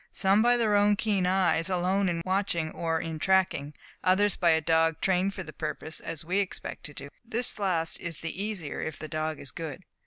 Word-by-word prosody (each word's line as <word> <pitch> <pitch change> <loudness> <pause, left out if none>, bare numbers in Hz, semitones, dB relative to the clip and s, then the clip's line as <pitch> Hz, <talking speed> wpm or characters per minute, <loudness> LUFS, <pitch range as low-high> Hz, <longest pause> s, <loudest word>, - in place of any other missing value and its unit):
"Some 195 +2 +3
by 240 +1 +4
their 220 -3 +2
own 205 0 +4
keen 200 -3 0
eyes 185 -2 +2
alone 185 +1 +1
in 165 -1 -2
watching 185 -4 0
or 165 -1 -1
in 160 -1 -5
tracking; 180 -6 +1 0.3
others 195 +3 +3
by 175 - +2
a 160 -1 +5
dog 160 0 +2
trained 190 +1 +1
for 185 - -5
the 155 - -10
purpose, 155 0 -4
as 160 0 -5
we 185 +4 +1
expect 195 -2 -4
to 145 - -9
do. 140 - -8
This 235 -1 +2
last 170 -5 0
is 170 -3 -5
the 165 +4 -4
easier 195 -9 -4
if 160 -3 -4
the 155 - -6
dog 155 0 -3
is 135 - -8
good. 165 +3 -6
180 Hz, 210 wpm, -28 LUFS, 160-195 Hz, 0.3 s, a